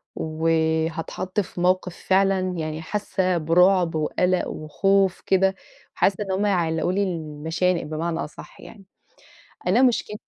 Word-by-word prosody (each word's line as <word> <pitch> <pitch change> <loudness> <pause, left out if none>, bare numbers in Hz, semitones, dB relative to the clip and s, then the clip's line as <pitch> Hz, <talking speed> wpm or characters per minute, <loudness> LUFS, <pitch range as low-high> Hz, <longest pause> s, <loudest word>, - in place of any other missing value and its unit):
وهاتحط 160 +3 -1
في 180 -2 -4
موقف 180 -1 +1
فعلًا 195 0 +3 0.2
يعني 155 0 -4
حاسّة 185 0 -1
برعب 175 +1 +3
وقلق 180 +4 0
وخوف 190 +5 +1
كده، 190 0 +2 0.4
وحاسّة 200 +1 +1
إن 195 - -5
هُم 195 +2 0
هيعلقوا 170 -3 +1
لي 200 +2 +1
المشانق 165 0 -2
بمعنى 160 +2 -3
أصح 150 - -8
يعني، 200 -3 -13 0.8
أنا 220 +8 +4
مشكل 235 -4 +1
180 Hz, 125 wpm, -23 LUFS, 160-195 Hz, 0.8 s, أنا